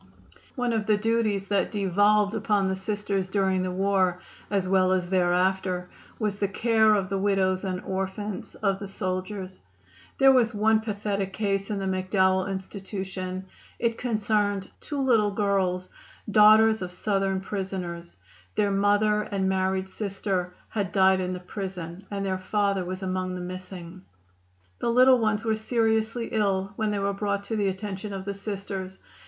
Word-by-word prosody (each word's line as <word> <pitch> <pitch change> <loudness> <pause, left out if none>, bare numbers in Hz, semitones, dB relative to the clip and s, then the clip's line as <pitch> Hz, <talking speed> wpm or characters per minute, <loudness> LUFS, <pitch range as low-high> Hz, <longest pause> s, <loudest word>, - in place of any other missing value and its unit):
One 245 -2 0
of 220 -2 -1
the 210 -1 +4
duties 215 -2 0
that 200 -2 +1
devolved 205 +1 +3
upon 210 -3 +1
the 190 - 0
Sisters 200 -1 -2
during 190 -1 +1
the 185 - -1
war, 185 -1 +1 0.3
as 195 -2 0
well 185 -1 +3
as 180 -1 -1
thereafter, 180 0 +1 0.3
was 210 -3 -1
the 205 - 0
care 220 +1 +3
of 190 -2 -1
the 195 0 -1
widows 190 -1 +1
and 185 -2 -2
orphans 190 +2 -4
of 195 -2 0
the 200 - -6
soldiers. 185 0 -4 0.6
There 270 0 +7
was 240 -3 +3
one 215 +1 +4
pathetic 200 -3 -3
case 195 -1 -1
in 210 - -1
the 195 - -3
McDowell 190 0 +1
Institution. 190 -1 -5 0.3
It 230 -1 -1
concerned 210 -4 0
two 290 -2 -5
little 230 -6 +3
girls, 195 -3 0 0.4
daughters 220 +1 +6
of 180 -1 -4
Southern 195 0 0
prisoners. 185 -3 -5 0.4
Their 205 -1 +2
mother 205 +2 +3
and 195 -2 -1
married 190 0 0
sister 190 -2 -3
had 200 -5 -2
died 190 -1 +4
in 180 0 -2
the 180 - -4
prison, 185 -1 -7
and 200 -1 -3
their 190 -1 -1
father 200 0 0
was 185 +2 -5
among 185 0 -2
the 180 - -5
missing. 185 0 -8 0.8
The - - 0
little 255 +1 +6
ones 215 0 0
were 220 -1 +2
seriously 225 +1 0
ill 200 -2 0
when 220 0 0
they 205 - -1
were 200 0 0
brought 200 0 -1
to 225 - -3
the 205 -2 +1
attention 195 +1 -4
of 190 -1 -5
the 200 - -2
Sisters. 195 -2 -5
195 Hz, 160 wpm, -26 LUFS, 185-210 Hz, 0.8 s, There